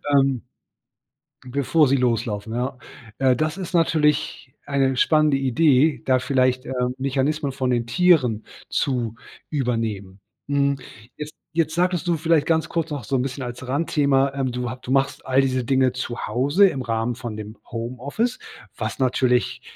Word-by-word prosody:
ähm, 135 -3 +3 1.0
bevor 140 +4 +2
sie 135 - +3
loslaufen, 115 -3 -1
ja. 125 +2 -2 0.4
Äh, 130 -1 +4
das 155 +5 -1
ist 185 -2 -6
natürlich 150 -5 +1
eine 135 -2 +1
spannende 155 -2 +3
Idee, 140 +2 +3
da 130 -1 +3
vielleicht, 130 -1 +1
äh, - - -4 0.3
Mechanismen 140 +2 -1
von 130 -1 -1
den 120 -1 0
Tieren 130 - +3 0.2
zu 120 -5 -1 0.3
übernehmen. 115 -8 -2 0.3
Hm, 140 -1 +1 0.4
jetzt 150 0 -7 0.2
jetzt 160 -2 0
sagtest 180 0 0
du 170 -1 +2
vielleicht 160 -1 +2
ganz 160 -1 +1
kurz 165 -1 -2
noch 145 -4 -4
so 135 - -1
'n 125 - +1
bisschen 130 +1 -4
als 120 +1 -7
Randthema, 140 -1 +2
ähm, 135 -2 -1
du 125 0 -3
hab 130 +1 -7
du - - -7
machst 135 0 +1
all 130 +1 +3
diese 130 -2 0
Dinge 130 0 +2
zu 125 -2 -4
Hause 145 - +3
im 135 -7 -4
Rahmen 115 0 -1
von 120 -2 -6
dem 110 0 -8
Homeoffice, 130 - -3 0.4
was - - -4
natürlich 125 -1 +1
135 Hz, 160 wpm, -23 LUFS, 125-150 Hz, 1.0 s, Äh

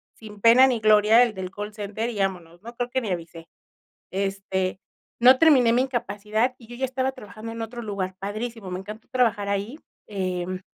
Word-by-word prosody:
sin 210 -2 -12
pena 240 +4 +7
ni 250 -3 0
gloria 215 +2 +6
el 235 -3 0
del 190 -2 -6
call 210 +2 -6
center 210 +2 -4
y 220 -4 -5
vámonos, 175 -3 -3
no 235 +3 -10
creo 245 0 -3
que 260 +1 -1
ni 215 -5 -3
avisé. 165 -1 -6 0.6
Este, 195 -1 -2 0.4
no 255 +2 +7
terminé 260 -7 +5
mi 245 +2 +3
incapacidad 240 -2 -1
y 230 - -15
yo 240 +1 -10
ya 265 - -2
estaba 260 0 -1
trabajando 225 -2 -9
en 230 0 -5
otro 235 +2 -6
lugar, 195 -3 -4
padrísimo, 215 +1 -5
me 180 - -3
encantó 210 +3 -10
trabajar 230 -5 +1
ahí. 200 +8 -2 0.3
Em, 185 -2 -3
215 Hz, 190 wpm, -24 LUFS, 195-240 Hz, 0.6 s, pena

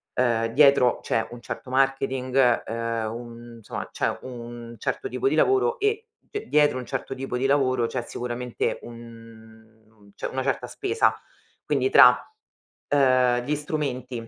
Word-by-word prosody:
uhm, 115 -2 +1
dietro 140 0 +4
c'è 115 0 -1
un 120 - -10
certo 125 - -7
marketing, 130 -2 +2
uhm, 115 -1 -3
un 120 0 -9
insomma 110 - -7
c'è - - -1
un 120 -2 -8
certo 400 - -3
tipo 400 - -1
di - - 0
lavoro 400 +5 +3
e 430 +2 0 0.2
cioè, 420 0 -5
dietro 150 -3 +3
un 125 - -7
certo 135 0 -4
tipo 130 -1 -4
di 130 - -1
lavoro 130 -4 +2
c'è 125 - -3
sicuramente 120 0 -3
un 120 -1 -9
mhmm, 110 -2 -16
c'è - - -4
una 130 - -3
certa 135 - -1
spesa. 415 +3 +1 0.5
Quindi 395 - +1
tra 460 - +10
uhm, - - +4 0.7
tra 130 -3 +3
gli 145 +5 -1
strumenti 130 -6 -4
125 Hz, 155 wpm, -25 LUFS, 115-135 Hz, 0.7 s, tra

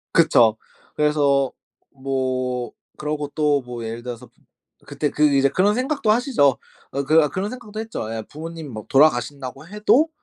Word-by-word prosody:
그쵸. 115 -9 +5 0.4
그래서 145 -3 +2 0.4
뭐 130 -2 -2 0.3
그러고 150 -1 -3
또 150 -3 +2
뭐 120 -2 -7
예를 115 +1 -6
들어서 120 -1 -7 0.6
그때 150 - -2
그 150 - -1
이제 135 0 +4
그런 200 +6 +2
생각도 255 -3 0
하시죠. 230 - +3 0.3
어 140 +1 -2
그 155 0 +4
그런 195 +3 -3
생각도 220 -4 -8
했죠. 215 - -5
예 110 - -3
부모님이 160 0 -7
막 110 -3 -8
돌아가신다고 135 0 +2
해도 215 - +3
145 Hz, 305 characters per minute, -22 LUFS, 130-175 Hz, 0.6 s, 그쵸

